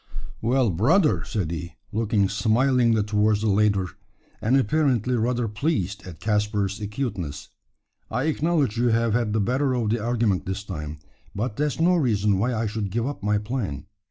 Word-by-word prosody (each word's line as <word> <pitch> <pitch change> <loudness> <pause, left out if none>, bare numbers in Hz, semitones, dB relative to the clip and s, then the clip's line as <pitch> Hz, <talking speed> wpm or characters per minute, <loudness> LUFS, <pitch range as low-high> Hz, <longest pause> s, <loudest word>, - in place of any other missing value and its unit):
"Well, 120 -1 +2
brother!" 140 - +3
said 95 -9 -2
he, 85 0 -5 0.2
looking 105 -2 +1
smilingly 115 +3 +2
towards 105 0 +2
the 110 - +1
latter, 100 -1 +2 0.6
and 125 +5 +3
apparently 130 -2 +1
rather 120 +1 0
pleased 105 - -2
at 85 -4 -10
Caspar's 105 -1 0
acuteness; 100 - -4 0.6
"I 125 +4 -1
acknowledge 155 -6 +1
you 120 - +3
have 115 -1 +2
had 115 -2 +1
the 110 - +1
better 130 +5 +1
of 115 -4 0
the 115 -2 -1
argument 110 -8 0
this 95 +1 -3
time; 75 -6 -6 0.4
but 110 +2 -2
that's 150 +2 -1
no 175 +2 +4
reason 105 - +2
why 120 +5 +1
I 115 +1 -1
should 105 -1 -3
give 115 +4 -1
up 145 +2 -4
my 105 +1 +1
plan. 105 - -3
110 Hz, 165 wpm, -24 LUFS, 100-125 Hz, 0.6 s, no